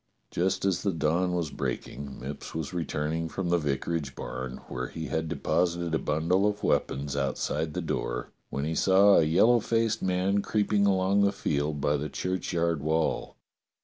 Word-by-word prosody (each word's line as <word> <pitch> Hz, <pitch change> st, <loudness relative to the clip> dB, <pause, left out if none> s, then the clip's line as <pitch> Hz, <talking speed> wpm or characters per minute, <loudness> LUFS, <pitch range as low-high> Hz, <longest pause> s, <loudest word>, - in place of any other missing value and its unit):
Just 95 Hz, +2 st, 0 dB
as 95 Hz, -3 st, +1 dB
the 100 Hz, -, +1 dB
dawn 85 Hz, +3 st, +1 dB
was 85 Hz, -4 st, -1 dB
breaking 70 Hz, 0 st, -5 dB
Mipps 70 Hz, +4 st, -7 dB
was 80 Hz, -1 st, -3 dB
returning 80 Hz, -1 st, -2 dB
from 95 Hz, 0 st, -3 dB
the 85 Hz, 0 st, +3 dB
vicarage 70 Hz, -1 st, -2 dB
barn, 65 Hz, 0 st, -5 dB
where 65 Hz, 0 st, -4 dB
he 80 Hz, -, -6 dB
had 80 Hz, +3 st, -1 dB
deposited 85 Hz, +1 st, 0 dB
a 80 Hz, -, +2 dB
bundle 85 Hz, +6 st, +1 dB
of 105 Hz, 0 st, -2 dB
weapons 70 Hz, +1 st, 0 dB
outside 75 Hz, +2 st, -1 dB
the 90 Hz, -, -2 dB
door, -, -, -3 dB, 0.2 s
when 70 Hz, +1 st, -2 dB
he 80 Hz, -, -1 dB
saw 100 Hz, +4 st, +5 dB
a -, -, +6 dB
yellow 100 Hz, +10 st, +5 dB
faced 115 Hz, 0 st, 0 dB
man 95 Hz, +2 st, +1 dB
creeping 105 Hz, -1 st, +2 dB
along 95 Hz, +1 st, +3 dB
the 100 Hz, 0 st, +4 dB
field 75 Hz, -6 st, -1 dB
by 75 Hz, +1 st, +2 dB
the 75 Hz, +2 st, -4 dB
churchyard 85 Hz, -2 st, -1 dB
wall. 80 Hz, +2 st, 0 dB
80 Hz, 170 wpm, -28 LUFS, 75-95 Hz, 0.2 s, a